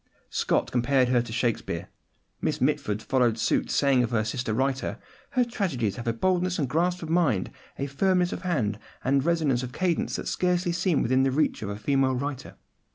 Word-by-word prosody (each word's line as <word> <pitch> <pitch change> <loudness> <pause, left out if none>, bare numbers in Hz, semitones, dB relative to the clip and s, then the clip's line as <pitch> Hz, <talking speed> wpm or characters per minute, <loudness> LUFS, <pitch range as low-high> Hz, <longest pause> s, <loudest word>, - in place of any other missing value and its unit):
Scott - - 0
compared 125 +1 +2
her 125 -1 +3
to 120 -1 -7
Shakespeare. 115 0 -1 0.5
Miss - - -1
Mitford 105 +1 0
followed 125 -4 +2
suit, - - +1
saying 135 -3 +3
of 120 - 0
her 115 -2 +1
sister 115 +1 -2
writer, 135 +4 -1 0.4
"Her 250 -2 +3
tragedies 155 - -2
have 120 - -6
a - - +3
boldness 180 +8 0
and 145 - 0
grasp 175 +6 0
of 160 - -6
mind, 145 - +2 0.3
a 140 - -2
firmness 180 +5 +1
of - - -5
hand, 125 - -1 0.2
and 135 0 +2
resonance 155 -7 +1
of 125 -1 -6
cadence 180 -3 0
that - - -4
scarcely 180 -1 +1
seem 175 -2 +1
within 130 +3 +2
the 135 - +3
reach 150 +4 0
of 105 - -4
a 100 - -4
female 130 +4 +1
writer." 135 0 -4
135 Hz, 190 wpm, -26 LUFS, 120-170 Hz, 0.5 s, her